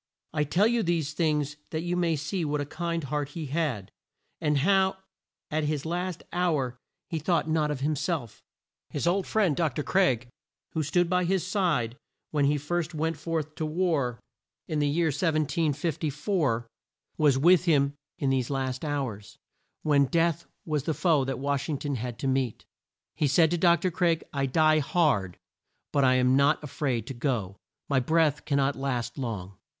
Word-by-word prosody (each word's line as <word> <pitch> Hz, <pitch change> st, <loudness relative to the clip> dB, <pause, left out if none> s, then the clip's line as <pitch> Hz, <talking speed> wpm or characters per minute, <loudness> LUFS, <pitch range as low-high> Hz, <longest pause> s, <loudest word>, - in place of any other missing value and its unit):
I 150 Hz, -1 st, +1 dB
tell 175 Hz, +8 st, +3 dB
you 235 Hz, +1 st, +2 dB
these 165 Hz, -5 st, 0 dB
things 150 Hz, -3 st, 0 dB
that 160 Hz, 0 st, -3 dB
you 175 Hz, 0 st, -1 dB
may 170 Hz, -2 st, +1 dB
see 150 Hz, +5 st, -2 dB
what 150 Hz, -1 st, -1 dB
a 145 Hz, -, -1 dB
kind 170 Hz, +2 st, -3 dB
heart 145 Hz, +1 st, -2 dB
he 160 Hz, +1 st, -6 dB
had, 140 Hz, -, -2 dB, 0.5 s
and 150 Hz, -1 st, +1 dB
how 190 Hz, +5 st, +3 dB, 0.5 s
at 155 Hz, 0 st, 0 dB
his 150 Hz, -1 st, -2 dB
last 175 Hz, +1 st, -3 dB
hour 155 Hz, -8 st, 0 dB, 0.3 s
he 165 Hz, -3 st, -3 dB
thought 165 Hz, +1 st, +1 dB
not 155 Hz, -1 st, +1 dB
of 145 Hz, -3 st, -3 dB
him 150 Hz, +2 st, +1 dB
self. 145 Hz, -, -3 dB, 0.5 s
His 145 Hz, -, -3 dB
old 185 Hz, +3 st, +1 dB
friend, 200 Hz, -9 st, +2 dB
Dr. 150 Hz, -3 st, 0 dB
Craik, 130 Hz, -12 st, +2 dB, 0.4 s
who 160 Hz, -, -1 dB
stood 170 Hz, +4 st, +2 dB
by 180 Hz, 0 st, +1 dB
his 185 Hz, 0 st, +1 dB
side 170 Hz, -, 0 dB, 0.3 s
when 145 Hz, -2 st, +2 dB
he 145 Hz, +1 st, +3 dB
first 170 Hz, +3 st, -2 dB
went 160 Hz, +2 st, 0 dB
forth 155 Hz, 0 st, -3 dB
to -, -, -2 dB
war, 155 Hz, -7 st, 0 dB, 0.5 s
in 155 Hz, -, -1 dB
the 145 Hz, -, +2 dB
year 160 Hz, +3 st, +2 dB
1754, 155 Hz, -, 0 dB, 0.5 s
was 145 Hz, -4 st, +4 dB
with 175 Hz, +5 st, +5 dB
him 140 Hz, -4 st, +3 dB, 0.2 s
in 135 Hz, -2 st, 0 dB
these 130 Hz, -2 st, 0 dB
last 130 Hz, -1 st, -2 dB
hours, 130 Hz, -9 st, -4 dB, 0.5 s
when 145 Hz, -2 st, +4 dB
Death 170 Hz, +3 st, +1 dB, 0.2 s
was 150 Hz, -3 st, -1 dB
the 160 Hz, -, 0 dB
foe 155 Hz, -3 st, +3 dB
that 135 Hz, 0 st, -2 dB
Wash 140 Hz, +2 st, -1 dB
ing 150 Hz, -, 0 dB
ton 145 Hz, +1 st, -3 dB
had 120 Hz, -1 st, -4 dB
to 135 Hz, -, -3 dB
meet. 130 Hz, -3 st, -1 dB, 0.5 s
He 150 Hz, -1 st, +1 dB
said 160 Hz, +3 st, +4 dB
to 175 Hz, -, +1 dB
Dr. 175 Hz, +1 st, +3 dB
Craik, 165 Hz, -1 st, +1 dB
"I 140 Hz, -1 st, 0 dB
die 155 Hz, +3 st, +4 dB
hard, 140 Hz, -, +1 dB, 0.5 s
but 140 Hz, -, +2 dB
I 130 Hz, -1 st, +5 dB
am 130 Hz, 0 st, +4 dB
not 140 Hz, +3 st, +3 dB
a -, -, -5 dB
fraid 130 Hz, -4 st, -2 dB
to 135 Hz, -, -6 dB
go, 120 Hz, -7 st, -2 dB, 0.3 s
my 140 Hz, -2 st, +2 dB
breath 155 Hz, +2 st, +2 dB
can 145 Hz, -2 st, +1 dB
not 140 Hz, 0 st, +2 dB
last 125 Hz, -2 st, -3 dB
long." 100 Hz, -7 st, -5 dB
150 Hz, 180 wpm, -27 LUFS, 135-170 Hz, 0.5 s, with